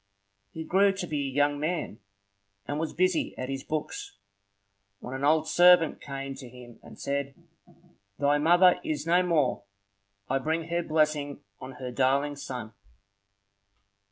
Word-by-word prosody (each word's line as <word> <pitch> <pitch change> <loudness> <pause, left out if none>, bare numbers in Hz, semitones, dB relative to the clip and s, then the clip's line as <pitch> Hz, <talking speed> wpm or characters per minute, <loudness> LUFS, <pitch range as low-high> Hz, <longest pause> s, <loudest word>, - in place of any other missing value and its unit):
He 160 - -6
grew 195 +4 +3
to 195 -2 -4
be 145 -4 -2
a - - -5
young 145 +1 +1
man, 155 - -3 0.7
and 145 +1 -2
was 160 0 -2
busy 185 -1 0
at 130 - -5
his 135 -1 -4
books 155 -9 -5 0.8
when 125 - -8
an 135 +1 -5
old 155 +2 +3
servant 175 -2 +5
came 135 -1 -6
to 130 -2 -10
him 120 -1 -14
and - - -14
said,— 140 -1 -3 0.8
"Thy 145 +1 +2
mother 175 +3 +5
is 150 -1 -3
no 175 +2 +4
more. 160 -8 +1 0.7
I 135 +1 0
bring 160 +3 -2
her 170 +1 0
blessing 155 -3 0 0.2
on 130 +1 -8
her 125 -1 -7
darling 135 +3 +1
son!" 125 -5 -7
145 Hz, 150 wpm, -28 LUFS, 135-165 Hz, 0.8 s, servant